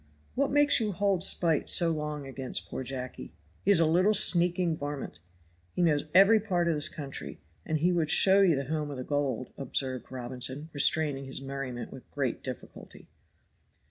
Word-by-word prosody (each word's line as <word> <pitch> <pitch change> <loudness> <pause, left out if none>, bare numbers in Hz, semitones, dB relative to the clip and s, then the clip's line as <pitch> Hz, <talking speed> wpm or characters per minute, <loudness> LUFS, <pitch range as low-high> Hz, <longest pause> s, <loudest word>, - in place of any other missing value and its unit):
"What 280 +1 0
makes 290 -1 +3
you 215 -3 -2
hold 195 -1 +1
spite 165 -5 +3
so 170 -2 +4
long 150 -2 -5
against 135 -1 -6
poor - - -6
Jacky?" 130 -5 -7 0.3
"He - - -1
is 200 -4 +6
a 165 - +3
little 185 +7 +2
sneaking 175 -2 +3
varmint." 145 -2 -7 0.6
"He 180 - 0
knows 150 -3 +1
every 200 +4 +6
part 180 -5 -1
of 170 - +1
this 150 -1 +3
country, 140 -3 -6 0.3
and 155 - -1
he 170 +4 +1
would 165 -3 -1
show 195 +4 +5
you 180 -5 +3
'the 135 0 -3
home 150 +1 -3
of 140 - -7
the 130 - -5
gold,'" 135 -4 -3
observed 130 -1 -2
Robinson, 130 +4 -4
restraining 145 -1 +1
his 135 - -7
merriment 135 -3 -7
with 130 - -13
great 135 -5 -3
difficulty. 130 -3 -10
150 Hz, 175 wpm, -28 LUFS, 135-175 Hz, 0.6 s, is